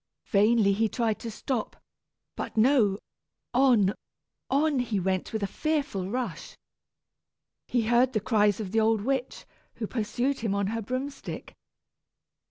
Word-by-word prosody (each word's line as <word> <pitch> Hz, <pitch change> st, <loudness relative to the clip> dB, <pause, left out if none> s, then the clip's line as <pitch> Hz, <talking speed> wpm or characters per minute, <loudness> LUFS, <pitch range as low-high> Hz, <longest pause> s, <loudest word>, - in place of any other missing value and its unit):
Vainly 210 Hz, -1 st, +4 dB
he 220 Hz, +2 st, +1 dB
tried 225 Hz, -3 st, -1 dB
to 230 Hz, -, -5 dB
stop, 225 Hz, +1 st, -3 dB, 0.6 s
but -, -, -6 dB
no; 220 Hz, -4 st, +4 dB, 0.6 s
on, 240 Hz, -7 st, +4 dB, 0.6 s
on 285 Hz, 0 st, +2 dB
he 230 Hz, -5 st, -1 dB
went 185 Hz, 0 st, -1 dB
with 220 Hz, -2 st, -2 dB
a -, -, +3 dB
fearful 275 Hz, -7 st, -2 dB
rush. 235 Hz, -7 st, -4 dB, 1.1 s
He 240 Hz, -2 st, +1 dB
heard 240 Hz, +3 st, +3 dB
the 215 Hz, -, +2 dB
cries 210 Hz, -2 st, +2 dB
of 200 Hz, -4 st, -4 dB
the 225 Hz, -, +2 dB
old 220 Hz, -1 st, +3 dB
witch, 265 Hz, +2 st, -2 dB, 0.3 s
who 225 Hz, -, -3 dB
pursued 245 Hz, +5 st, -1 dB
him 215 Hz, -3 st, -1 dB
on 200 Hz, 0 st, 0 dB
her 225 Hz, -, -2 dB
broom 255 Hz, +6 st, -3 dB
stick. 275 Hz, -, -9 dB
225 Hz, 145 wpm, -27 LUFS, 205-255 Hz, 1.1 s, Vainly